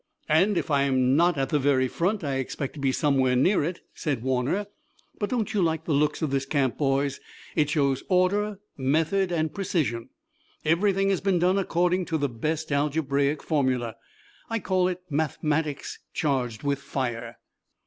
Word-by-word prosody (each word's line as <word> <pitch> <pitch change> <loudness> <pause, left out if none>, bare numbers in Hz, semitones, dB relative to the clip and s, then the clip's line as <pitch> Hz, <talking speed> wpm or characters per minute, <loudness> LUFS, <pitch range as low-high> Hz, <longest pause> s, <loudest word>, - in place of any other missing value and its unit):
"If 180 +2 +3
I'm 135 -2 +3
not 170 +1 +3
at 135 -1 0
the 150 - +2
very 130 -2 +3
front 185 - -1
I 140 -2 -1
expect 135 +1 -4
to 150 - -10
be 135 -1 +1
somewhere 130 -2 +2
near 180 +8 +3
it," 170 +3 -3
said 135 -8 -2
Warner. 130 +10 0 0.5
"But 205 - -1
don't 225 -3 -1
you 205 - +2
like 160 -2 0
the 160 - 0
looks 150 +2 +1
of 150 - 0
this 135 0 -1
camp, 135 -4 +1
boys? 140 -1 +1 0.4
It 150 -3 +2
shows 140 -3 +1
order, 200 +3 +2 0.2
method 160 +8 +1
and 160 -2 0
precision. 155 -12 -1 0.6
Everything 195 +4 +2
has 195 - 0
been 195 -2 +2
done 180 +3 +3
according 180 0 +1
to 160 - -1
the 145 -2 0
best 155 +7 -3
algebraic 145 0 +1
formulae. 130 -6 0 0.6
I 225 - 0
call 185 -3 +1
it 180 0 -4
mathematics, 150 0 -1 0.2
charged 125 -7 -1
with 140 -1 0
fire. 120 -4 -4
150 Hz, 165 wpm, -26 LUFS, 135-180 Hz, 0.6 s, If